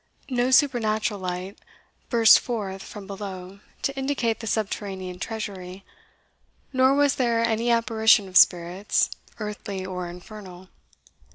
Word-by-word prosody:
No 245 0 +1
supernatural 225 -6 +2
light 185 +1 -5 0.5
burst 230 -2 +7
forth 200 -6 -4
from 205 0 -10
below 195 -1 -8 0.2
to 275 - -1
indicate 265 -4 -1
the 225 - -7
subterranean 195 -4 -3
treasury, 195 -4 -6 0.9
nor 260 +1 +4
was 285 -1 +2
there 235 -3 +1
any 230 +1 0
apparition 220 -2 +3
of 185 - -13
spirits, 180 +3 +3 0.3
earthly 205 -3 -5
or 180 -2 -5
infernal. 185 0 -11
210 Hz, 115 wpm, -25 LUFS, 190-230 Hz, 0.9 s, burst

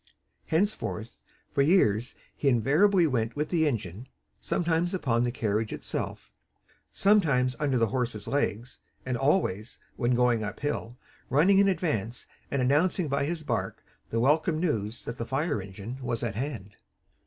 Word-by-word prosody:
Henceforth 160 - -1 0.3
for 140 - +2
years 125 - +3 0.2
he 145 - -2
invariably 160 - +4
went 120 -6 -1
with 150 +1 -2
the 160 -3 +2
engine, 110 - -4 0.3
sometimes 170 +1 0
upon 120 -9 +1
the 120 - 0
carriage 110 -2 -1
itself, - - -5 0.6
sometimes 145 -12 +3
under 140 -4 +1
the 115 -2 +2
horses' 120 -5 -2
legs; 120 -4 -2 0.3
and 130 -1 -1
always, 120 - 0 0.2
when 120 -1 +1
going 120 -2 +2
uphill, 120 +2 -4 0.3
running 180 +9 +5
in 200 - +5
advance, 150 - -1 0.2
and 140 -2 0
announcing 155 +5 +2
by 140 0 +1
his 160 +1 -3
bark - - -3 0.3
the 115 - -1
welcome 155 +5 +2
news 115 - -2
that 115 - -6
the - - -1
fire 135 - -1
engine 100 +6 -8
was 120 -2 -2
at 115 -4 -2
hand. 110 -5 -5
130 Hz, 145 wpm, -28 LUFS, 115-155 Hz, 0.6 s, running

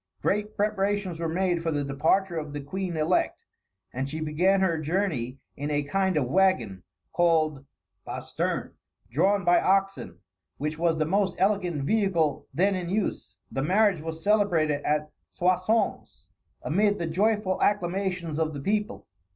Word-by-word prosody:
Great 210 +1 0
preparations 200 -4 0
were 165 -1 -1
made 175 0 0
for 165 - -1
the 145 -2 -1
departure 160 +7 +1
of 150 -2 -4
the 145 - -4
queen 175 +4 -4
elect, 155 0 0 0.5
and 130 +2 -3
she 155 +3 -4
began 170 +6 +2
her 170 -4 +1
journey 155 -7 -1 0.2
in 145 +2 -4
a 145 -1 0
kind 190 +3 0
of 145 - +2
wagon, 125 - +1 0.3
called 160 -5 +2 0.4
basterne, - - -3 0.4
drawn 195 - +2
by 175 0 +5
oxen, 195 - 0 0.4
which 150 +2 -3
was 165 -1 +2
the 155 - +1
most 190 +2 +1
elegant 185 -7 +1
vehicle 170 -6 +1
then 195 +4 +2
in 180 -2 -3
use. 205 +2 -2 0.2
The 135 - -2
marriage 190 +2 +3
was 160 0 -6
celebrated 175 -9 +2
at 150 +1 -1 0.2
Soissons, 185 +5 0 0.4
amid 205 +5 +2
the 170 - -2
joyful 200 +3 0
acclamations 180 -4 0
of 155 -2 -1
the - - -4
people. 210 - -2
175 Hz, 150 wpm, -27 LUFS, 155-195 Hz, 0.5 s, by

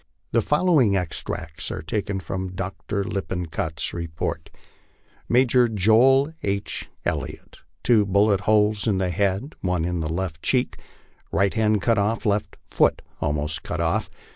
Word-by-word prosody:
The 115 - +3
following 150 - +3
extracts 80 -2 -3
are - - -5
taken 100 +3 -2
from 95 -1 -4
Dr. 95 +2 -3
Lippincott's 90 -5 -3
report: 85 -2 -4 0.4
'* - - -35
Major 125 0 +4
Joel 120 - +4
H. 100 +1 -3 0.2
Elliott, - - -4 0.2
two 110 -4 +4
bullet 100 +1 +3
holes 105 +1 +2
in 100 -4 +2
head, 95 - 0
one 90 -3 0
in 90 -1 -1
left 80 +1 -3
cheek, 130 -1 +1 0.5
right 100 0 +2
hand 110 -3 +1
cut 115 -3 +3
off, 110 +3 0
left 105 0 0
foot - - +2 0.2
almost 75 +1 -1
cut 80 - -4
off 85 -1 0
100 Hz, 135 wpm, -24 LUFS, 90-110 Hz, 0.5 s, Major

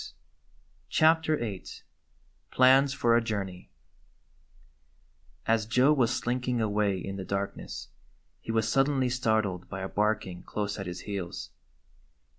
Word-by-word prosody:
95 - - -11 0.7
CHAPTER 160 -1 +3
VIII 105 -7 -5 0.8
PLANS 130 +2 +5
FOR 120 -3 +2
A 120 - +4
JOURNEY 95 -5 -4 1.8
A - - +3
S 110 -1 +2
Joe 125 +5 +4
was 125 -6 +2
slinking 125 0 -1
away 105 -2 +1
in 95 +2 -5
the 95 - -4
darkness 100 +1 -4 0.5
he - - -5
was 110 -1 +1
suddenly 135 +1 +2
startled 110 -7 0
by 95 -1 -5
a 95 - -3
barking 105 -4 -1
close 105 0 -4
at 100 - -5
his 90 0 -6
heels. 95 -4 -5
110 Hz, 130 wpm, -28 LUFS, 100-125 Hz, 1.8 s, PLANS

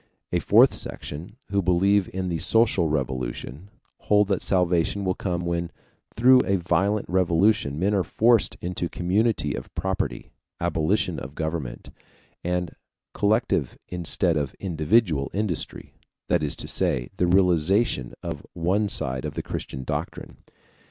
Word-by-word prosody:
A - - +2
fourth - - +5
section, 85 +9 -7 0.2
who 100 0 +2
believe 95 +2 +2
in 95 -1 -3
the 85 -2 -2
social 100 -2 +3
revolution, 65 +4 -3 0.3
hold 105 -1 +3
that 100 - +1
salvation 90 +1 +1
will 95 - +1
come 90 -2 -3
when 85 0 -1 0.5
through 125 +3 +6
a 100 - +1
violent 95 +4 0
revolution 90 -3 +2
men 95 +5 +1
are 95 -2 +2
forced 115 +3 +2
into 90 -1 -3
community 105 +6 0
of - - -7
property, 95 +2 -3 0.3
abolition 85 +7 0
of 70 +4 -9
government, 80 -6 -4 0.5
and 90 0 -2 0.4
collective 105 - +1
instead 85 -1 0
of 70 -3 -2
individual 85 -3 +1
industry 100 -5 -3 0.4
that 90 - +3
is 75 -2 0
to - - -5
say, - - -1
the 90 - +2
realization 90 - +2
of 80 -4 -5
one 95 +5 0
side 65 -7 -2
of - - -5
the - - -3
Christian 65 - -5
doctrine. - - -5
90 Hz, 140 wpm, -25 LUFS, 80-100 Hz, 0.5 s, through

